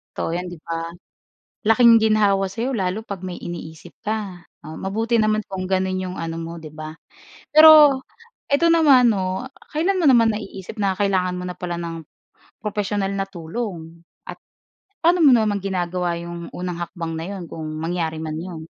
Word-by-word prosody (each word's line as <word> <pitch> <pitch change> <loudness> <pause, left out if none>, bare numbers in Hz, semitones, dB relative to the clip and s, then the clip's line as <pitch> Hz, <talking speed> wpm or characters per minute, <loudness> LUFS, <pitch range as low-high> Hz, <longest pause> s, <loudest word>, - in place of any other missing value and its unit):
Totoo - - -2
'yan, 180 +1 -3
'di 175 -2 -9
ba? 165 0 -4 0.8
Laking 230 +1 +7
ginhawa 210 -3 +3
sa 225 - -9
'yo 260 - -1
lalo 190 0 -1
'pag 200 -4 -7
may 180 -1 -5
iniisip 160 -2 -8
ka. 205 -5 -4 0.2
Ah, 155 +1 -8
mabuti 225 +5 -1
naman 215 -1 +2
kung 190 -1 -4
gano'n 190 0 0
'yong 185 0 -6
ano 165 0 -4
mo, 165 +1 -6
'di 155 - -9
ba? 155 0 -7 0.6
Pero 305 -3 +8 0.5
eto 310 +4 +3
naman 280 -7 +6
'no, 190 -1 -1 0.3
kailan 350 +6 +1
mo 335 - +2
naman 235 -4 +6
naiisip 205 -1 -7
na 195 -2 +1
kailangan 185 -2 0
mo 180 - -5
na 180 - -6
pala 175 -1 -4
ng 165 -1 -6 0.6
professional 205 -2 -2
na 195 0 -1
tulong 170 -2 -7 0.2
at - - -7 0.7
paano 345 +2 +4
mo 280 - +8
naman 215 -3 +1
ginagawa 180 -2 -2
'yong 170 0 -7
unang 180 -1 -4
hakbang 170 -2 -5
na 160 +1 -4
'yon 195 -3 -6
kung 160 -1 -7
mangyari 165 0 -2
man 155 -1 -4
'yon? 170 -2 -7
190 Hz, 175 wpm, -22 LUFS, 170-220 Hz, 0.8 s, Pero